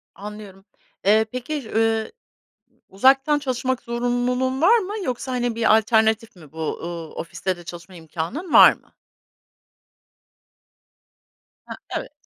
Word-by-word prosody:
Anlıyorum. 200 -1 -10 0.4
Eee, 215 +2 +4
peki, 255 0 -5
ııı, 225 0 +1 0.8
uzaktan 270 +8 +3
çalışmak 260 -2 -2
zorunluluğun 245 +2 -1
var 435 +8 +6
mı 400 0 -5
yoksa, 255 +1 -3
hani, 245 -2 -1
bir 225 -1 +4
alternatif 220 -1 +1
mi 155 -5 -16
bu? 160 -1 -4
Iıı, 170 -2 -6
ofiste 185 +2 -4
de 175 - -12
çalışma 170 +2 -10
imkânın 170 - -6
var - - +9
mı? - - -24 2.7
Ha, - - -8 0.2
evet. - - -7
225 Hz, 120 wpm, -22 LUFS, 195-260 Hz, 2.7 s, var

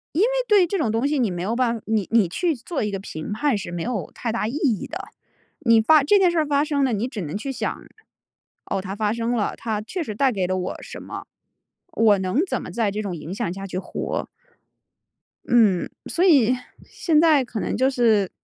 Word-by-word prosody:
因 340 - +2
为 440 - +5 0.2
对 410 -4 +5
这 390 +3 -2
种 255 - 0
东 225 +5 +1
西 295 -1 0
你 235 -5 +2
没 175 0 -4
有 225 +4 -1
办 240 -2 +1
法 220 - -11
你 215 -3 0
你 225 -5 +4
去 325 - 0
做 265 +3 -4
一 210 - -1
个 195 - -3
评 160 -1 -7
判 260 +2 +1
是 190 - -6
没 175 -1 -3
有 220 -9 -3
太 230 - -3
大 220 -2 -1
意 - - -3
义 265 - 0
的， - - -7 0.5
你 230 -2 +5
发 305 +5 +5
这 400 +9 +5
件 365 -3 +4
事 340 - +1
儿 310 - +2
发 285 0 +2
生 290 -2 0
了， 255 -4 +1
你 215 +4 -1
只 230 -5 -6
能 160 +3 -4
去 270 +5 -4
想： 265 - -3 0.9
“哦， 195 -1 -2
它 195 0 -6
发 210 0 0
生 235 +1 -2
了， 210 - -1
它 220 -2 -3
确 345 - -4
实 215 -8 -6
带 265 +3 +3
给 190 -4 -1
了 185 0 -1
我 180 0 -3
什 - - -9
么？ - - -8 0.7
我 215 -3 +4
能 190 +7 0
怎 - - -1
么 - - -8
在 225 -3 0
这 210 +2 -3
种 195 -4 -4
影 165 +2 -7
响 170 - -2
下 195 +1 -7
去 180 - -5
活？” 185 - -4 1.2
嗯， 215 -7 +3 0.2
所 350 - 0
以 255 - +5 0.3
现 320 -4 +1
在 310 -4 +5
可 230 - -5
能 - - -2
就 260 +3 +3
是 225 -7 +2
230 Hz, 250 characters per minute, -23 LUFS, 200-280 Hz, 1.2 s, 为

